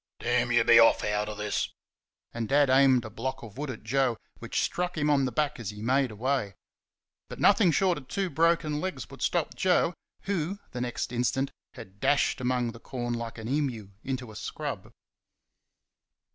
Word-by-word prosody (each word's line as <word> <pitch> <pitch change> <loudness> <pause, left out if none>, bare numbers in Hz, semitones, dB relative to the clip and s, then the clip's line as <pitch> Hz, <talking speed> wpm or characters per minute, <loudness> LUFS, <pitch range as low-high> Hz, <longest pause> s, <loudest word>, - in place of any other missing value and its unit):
"DAMN 120 0 +1
you, 120 -1 +4
be 115 0 +7
off 115 - +5
out 105 0 0
of 105 - -6
this!" 105 -1 -2 0.6
And 115 -2 -3
Dad 145 -1 +4
aimed 130 -3 +5
a - - -6
block 130 +4 -4
of 110 -4 -10
wood 150 -1 -3
at 125 - -7
Joe 125 0 +1 0.2
which - - -2
struck 180 -1 -2
him 150 0 +2
on 140 -2 +3
the 130 - -2
back 145 +2 -1
as 110 -5 -4
he 105 0 -8
made 130 +2 +2
away. 110 -2 -1 0.7
But - - -8
nothing 200 -2 +5
short 180 0 +2
of 130 - -16
two 195 -3 -2
broken 165 -2 +2
legs 185 0 -4
would - - -11
stop - - 0
Joe, - - +2 0.3
who 195 -1 -2
the 125 - -5
next 120 -1 -3
instant 125 +3 0 0.2
had 105 -5 -12
dashed 145 0 +2
among 125 -1 0
the 115 - -12
corn 120 -1 -4
like 115 -1 -5
an 110 0 -6
emu 125 -7 -2
into 130 -3 -4
a - - -13
scrub. - - -5
125 Hz, 185 wpm, -28 LUFS, 115-145 Hz, 0.7 s, be